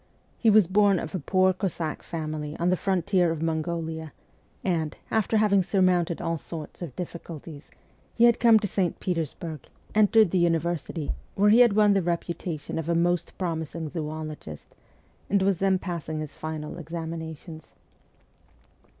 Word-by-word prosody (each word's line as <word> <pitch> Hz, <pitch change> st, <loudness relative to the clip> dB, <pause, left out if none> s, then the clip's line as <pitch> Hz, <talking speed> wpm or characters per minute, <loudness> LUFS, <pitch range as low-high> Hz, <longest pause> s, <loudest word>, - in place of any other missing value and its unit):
He 230 Hz, -, +4 dB
was 215 Hz, -2 st, +6 dB
born 200 Hz, +2 st, +4 dB
of -, -, -5 dB
a 185 Hz, -, -1 dB
poor 185 Hz, +1 st, +3 dB
Cossack 175 Hz, -5 st, -3 dB
farnily 155 Hz, -2 st, -5 dB
on 170 Hz, +1 st, +2 dB
the -, -, +4 dB
frontier 185 Hz, -1 st, +1 dB
of 165 Hz, -1 st, -2 dB
Mongolia, 160 Hz, -1 st, -3 dB, 0.5 s
and, 165 Hz, -5 st, -1 dB
after 220 Hz, 0 st, +2 dB
having 205 Hz, -2 st, +4 dB
surmounted 180 Hz, -3 st, +2 dB
all 165 Hz, -1 st, -2 dB
sorts 160 Hz, +2 st, -8 dB
of 165 Hz, -8 st, -6 dB
difficulties, 165 Hz, -3 st, -8 dB, 0.5 s
he 230 Hz, -, +3 dB
had 235 Hz, 0 st, +6 dB
come 230 Hz, -2 st, +7 dB
to 205 Hz, -, -1 dB
St. 185 Hz, -2 st, -1 dB
Petersburg, 165 Hz, -3 st, -4 dB, 0.3 s
entered 215 Hz, -2 st, +5 dB
the 185 Hz, -, +2 dB
university, 170 Hz, -2 st, 0 dB, 0.2 s
where 205 Hz, +1 st, +4 dB
he 225 Hz, -, +6 dB
had 240 Hz, -4 st, +6 dB
won 210 Hz, -1 st, +5 dB
the 195 Hz, -, +2 dB
reputation 170 Hz, -2 st, -3 dB
of 165 Hz, +1 st, -4 dB
a 170 Hz, -, +2 dB
most 175 Hz, 0 st, 0 dB
promising 160 Hz, -2 st, -3 dB
zoologist, 155 Hz, -, -6 dB, 0.6 s
and 200 Hz, 0 st, +3 dB
was 195 Hz, -2 st, +2 dB
then 195 Hz, -1 st, +3 dB
passing 170 Hz, -4 st, -4 dB
his 155 Hz, -1 st, -5 dB
final 155 Hz, 0 st, -6 dB
examinations. 160 Hz, -1 st, -7 dB
170 Hz, 150 wpm, -26 LUFS, 160-190 Hz, 0.6 s, come